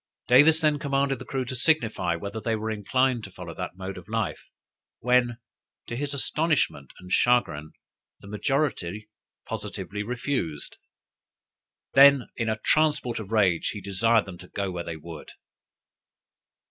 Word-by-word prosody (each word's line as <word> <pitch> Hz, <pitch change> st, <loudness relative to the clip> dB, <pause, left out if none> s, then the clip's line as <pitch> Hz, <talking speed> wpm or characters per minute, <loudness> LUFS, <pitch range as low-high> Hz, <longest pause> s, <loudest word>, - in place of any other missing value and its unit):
Davis 155 Hz, +6 st, +6 dB
then 150 Hz, -2 st, +2 dB
commanded 140 Hz, -2 st, 0 dB
the -, -, -8 dB
crew 135 Hz, -1 st, -2 dB
to 130 Hz, +1 st, -4 dB
signify 115 Hz, -, +1 dB
whether 100 Hz, +5 st, -6 dB
they 115 Hz, +1 st, 0 dB
were 110 Hz, +1 st, -3 dB
inclined 120 Hz, +3 st, +1 dB
to 100 Hz, -, -8 dB
follow 90 Hz, -2 st, -9 dB
that 85 Hz, -, -6 dB
mode 95 Hz, 0 st, -6 dB
of 90 Hz, -, -16 dB
life, 110 Hz, -8 st, -2 dB, 0.5 s
when, 125 Hz, -1 st, +2 dB, 0.5 s
to 120 Hz, -, -5 dB
his 140 Hz, +2 st, -3 dB
astonishment 145 Hz, -, 0 dB
and 90 Hz, 0 st, -12 dB
chagrin, 85 Hz, -13 st, +2 dB, 0.5 s
the -, -, -14 dB
majority 105 Hz, -, -2 dB, 0.4 s
positively 105 Hz, +1 st, -5 dB
refused. 115 Hz, -, -3 dB, 1.2 s
Then, 140 Hz, -2 st, +7 dB
in 115 Hz, -2 st, -1 dB
a 110 Hz, -, 0 dB
transport 150 Hz, -7 st, +2 dB
of 110 Hz, -1 st, -8 dB
rage, 95 Hz, -7 st, +2 dB
he 105 Hz, -, -6 dB
desired 105 Hz, +4 st, +2 dB
them 90 Hz, -3 st, -10 dB
to 90 Hz, -, -11 dB
go 100 Hz, -1 st, -3 dB
where 90 Hz, -1 st, -4 dB
they 85 Hz, -2 st, -6 dB
would. 80 Hz, 0 st, -10 dB
110 Hz, 145 wpm, -26 LUFS, 95-135 Hz, 1.2 s, Then